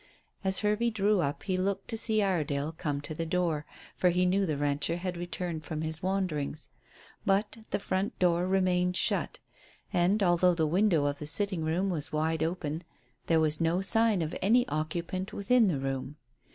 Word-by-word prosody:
As 190 0 +1
Hervey 210 +3 +2
drew 210 -2 +2
up 140 -1 -2
he 190 -2 -1
looked 195 +1 -1
to - - -1
see 220 -1 +1
Iredale 155 -6 0
come 145 -3 -3
to 155 - -5
the 165 - -3
door, 165 -3 -1 0.3
for 180 - +3
he 180 +1 +2
knew 190 +2 +2
the 155 -3 -1
rancher 145 +3 0
had 180 0 -4
returned 175 -2 -4
from 155 -1 -4
his 160 +1 -4
wanderings; 180 -6 -2 0.5
but 200 +3 +1
the - - 0
front 195 0 -2
door 175 0 +2
remained 180 -1 +2
shut, - - 0 0.6
and, 190 +3 +3
although 175 0 +4
the 160 -2 +1
window 170 -2 +2
of 145 0 -1
the 150 - -5
sitting 190 0 -2
room 175 +5 0
was 150 -5 -4
wide 160 +1 0
open, 160 -1 -2 0.4
there 165 -1 +4
was 155 0 +1
no 165 +2 +2
sign 220 -2 +4
of 155 - -4
any 240 +6 +4
occupant 170 +4 -3
within 225 +3 +3
the 170 -7 +1
room. 135 +1 -3
175 Hz, 180 wpm, -29 LUFS, 155-195 Hz, 0.6 s, although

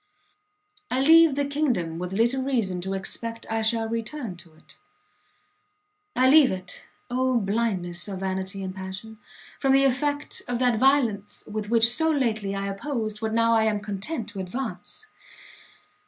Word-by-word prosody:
I 255 - 0
leave 320 +1 +6
the 285 0 0
kingdom 250 - -1
with 180 0 -4
little 235 +6 +1
reason 225 -9 -1
to 190 +2 -3
expect 230 +4 -2
I 225 0 0
shall 225 0 +1
return 230 -1 -4
to 170 -2 -14
it; 155 - -15 1.4
I 255 - +4
leave 285 -1 +6
it 185 -1 -7 0.2
Oh 255 0 +1
blindness 195 -5 -1
of 195 -2 -6
vanity 190 +1 -3
and 185 0 -5
passion! 190 +3 -8 0.4
from 270 -1 +2
the 270 0 +5
effect 285 +2 0
of 245 -1 -1
that 245 -3 +2
violence 240 -7 +1
with 215 -1 -5
which 230 0 +5
so 320 +7 +3
lately 220 -9 0
I 195 0 -3
opposed 215 0 -4
what 220 0 -2
now 230 0 +3
I 220 -1 +3
am 210 -1 +1
content 210 +5 -4
to 195 - -8
advance! 250 - -6
225 Hz, 155 wpm, -25 LUFS, 195-260 Hz, 1.4 s, leave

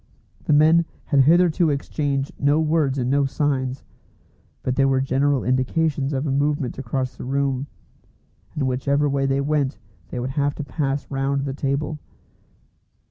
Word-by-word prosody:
The - - +2
men 160 +3 +5 0.2
had 145 - +2
hitherto 170 0 +4
exchanged 140 -1 -2
no 145 +2 +3
words 155 -3 +1
and 125 -2 -1
no 140 +2 +2
signs, 135 -2 -1 0.8
but 130 - -1
there 135 0 +3
were 135 -1 +2
general 135 +1 +1
indications 135 +3 0
of 135 +1 -1
a 140 - -1
movement 140 -2 0
across 130 0 -3
the - - -8
room, 135 +1 -1 0.9
and 140 -3 0
whichever 140 +3 +1
way 135 -1 0
they 135 0 +1
went 145 -1 0 0.3
they 125 - -4
would 125 +2 -3
have 145 +1 0
to 150 - -5
pass 140 -1 -2
round 135 0 -1
the 135 - -3
table. 140 +2 -2
140 Hz, 155 wpm, -22 LUFS, 135-145 Hz, 0.9 s, men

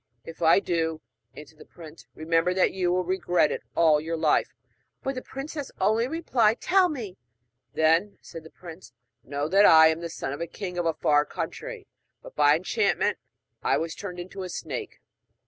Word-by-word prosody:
'If 165 +1 -11
I 165 +3 +5
do,' 165 -4 -2 0.4
answered 150 +1 -13
the - - -13
prince, 160 -1 -14
'remember 165 +3 0
that 185 - +3
you 180 -2 0
will 180 +1 +1
regret 175 -3 +1
it - - -4
all 155 -3 +4
your 165 +1 -3
life.' - - +1 0.5
But 270 - -2
the 255 - -5
princess 280 +2 -7
only 225 +3 +2
replied 250 -8 +1
'Tell 370 0 +3
me!' 230 - -6 0.6
'Then,' 165 +6 +2
said 165 - -11
the 160 - -13
prince, 170 -4 -13 0.3
'know 145 +2 -3
that 200 +3 +6
I 160 0 +8
am 160 0 -1
the 170 - -5
son 150 - -5
of 140 - -7
the 170 - -3
king 180 0 -6
of 170 - 0
a 165 - 0
far 145 -1 +3
country, - - -6 0.4
but - - -13
by - - +5
enchantment 440 - 0 0.4
I - - +1
was 165 0 -3
turned 180 -3 -7
into 185 +2 -8
a 185 - -5
snake.' 150 -6 -6
175 Hz, 185 wpm, -26 LUFS, 160-210 Hz, 0.6 s, I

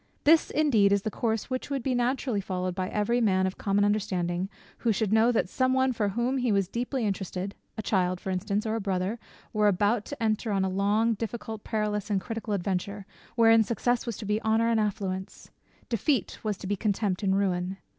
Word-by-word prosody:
This 320 +2 +6
is - - -4
indeed 225 -10 +4
the 200 +1 +1
course 225 +3 -2
which 255 +2 -3
would 275 -3 -2
be 265 - 0
naturally 245 -2 0
followed 185 -1 -2
by 185 +1 -3
every 235 +4 +1
man 190 -4 +3
of 190 - -3
common 200 0 +2
understanding, 185 -3 0 0.3
who 235 - +2
should 215 -1 0
know 225 +2 +5
that 230 - +1
some 255 +6 +1
one 260 0 +2
for 210 -3 0
whom 240 +6 0
he 245 -2 +1
was 195 -2 +2
deeply 245 +3 -2
interested, 195 -1 -3 0.2
a 220 - -3
child, 185 -3 +1
for 190 - -4
instance, 200 +3 -1
or 220 - -1
a 225 - -1
brother, 195 +3 -1 0.3
were 210 -1 +3
about 205 +3 +2
to 285 -5 -6
enter 220 0 0
on 195 -1 +1
a - - 0
long, 205 +4 +2
difficult, 225 0 -5
perilous, 210 -2 -2
and 200 -2 +2
critical 225 0 -3
adventure, 195 +2 -3 0.3
wherein 225 -1 +6
success 240 +2 0
was 230 - -3
to 215 - -7
be 210 +2 0
honour 220 +1 +2
and 230 -1 +2
affluence; 195 -2 -3 0.4
defeat 245 +4 0
was 210 -3 -1
to - - -9
be 205 +2 0
contempt 200 -1 -1
and 195 -1 +2
ruin. 185 -1 0
210 Hz, 205 wpm, -28 LUFS, 195-230 Hz, 0.4 s, This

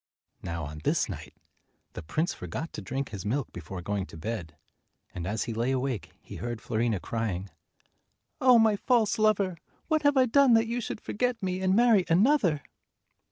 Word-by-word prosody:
Now 85 -1 -4
on 75 +1 -7
this - - +1
night, - - -8 0.6
the - - -6
prince 155 - -1
forgot 110 - -6
to - - -6
drink 130 +8 -3
his 100 -4 -6
milk 120 +5 -2
before 90 +2 -7
going 100 0 -2
to - - -11
bed, 85 -5 -5 0.6
and 90 -1 -5
as 105 +2 -1
he 115 - -4
lay 115 +3 0
awake 130 - -1
he - - -10
heard 120 -1 -4
Fiorina 115 -2 -1
crying, 100 -3 -3 0.9
"Oh, 255 -2 +7
my 220 -2 +5
false 225 0 +2
lover! 200 -4 +2 0.3
What 310 -1 +2
have 285 -1 +3
I 260 - +6
done 255 0 +5
that 225 0 +4
you 235 +2 -2
should 215 - -5
forget 245 -1 -2
me 185 0 -1
and 190 0 +2
marry 225 -5 +5
another?" 180 - +3
140 Hz, 180 wpm, -28 LUFS, -, 0.9 s, Oh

